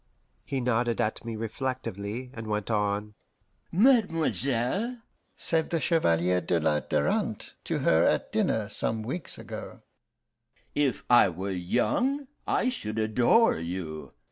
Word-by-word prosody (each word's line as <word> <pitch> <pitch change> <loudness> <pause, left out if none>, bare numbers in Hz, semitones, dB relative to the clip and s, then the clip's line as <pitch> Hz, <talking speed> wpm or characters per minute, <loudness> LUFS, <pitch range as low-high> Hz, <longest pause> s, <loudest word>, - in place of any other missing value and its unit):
He 135 -2 -3
nodded 120 -1 +1
at 110 -2 -1
me 115 -1 -5
reflectively, 115 0 -4
and 115 -2 -7
went 105 +1 -2
on: 105 0 0 0.6
"'Mademoiselle,' 190 - +2 0.4
said 160 -1 0
the 165 - 0
Chevalier 90 - +2
de 85 -1 +1
la 75 -1 +2
Darante - - -1
to - - -1
her 80 - +4
at - - +1
dinner, 110 -2 +1
some 110 +1 -2
weeks 135 +8 -5
ago, - - -8 0.9
'if 140 -7 0
I 120 -5 +6
were 95 +3 -4
young, 245 - 0 0.2
I 250 - +2
should 110 - -4
adore 115 - +4
you. 85 -2 -5
115 Hz, 125 wpm, -28 LUFS, 100-145 Hz, 0.9 s, I